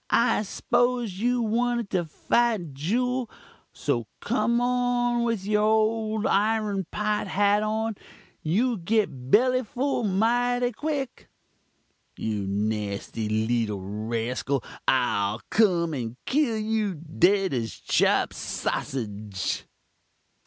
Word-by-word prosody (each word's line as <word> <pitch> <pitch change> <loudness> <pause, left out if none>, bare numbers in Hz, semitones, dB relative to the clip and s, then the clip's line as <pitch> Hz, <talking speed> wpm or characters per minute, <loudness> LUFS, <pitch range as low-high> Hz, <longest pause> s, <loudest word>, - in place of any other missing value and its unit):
I 230 -2 +3
'sposed 240 +1 0
you 240 +5 0
wanted 235 0 0
to 180 -3 +1
fite 205 - 0
juul 245 - -1 0.4
so - - -2
kum 235 0 +1
on 245 -1 +1
with 230 -5 -1
your 210 0 +2
old 220 0 +2
irun 210 - +1
pot 210 -1 -1
hat 205 +2 +3
on 220 +1 -1 0.5
you'll 225 +9 +1
git 170 - -1
belly 255 - +4
full 255 +4 -1
mighty 245 +5 +2
quick 280 +1 -4 0.4
' - - -44
"'You 105 -3 -2
nasty 105 +1 -2
leetle 110 -1 0
raskul, 115 +6 -2 0.2
I'll 110 -5 +2
kum 175 -7 +3
and 120 -3 -4
kill 265 -5 +1
you 215 -3 -1
dead 175 +4 +2
as 115 -4 -2
chopped - - +2
sassudge.'" 105 -6 -3
210 Hz, 110 wpm, -26 LUFS, -, 0.5 s, belly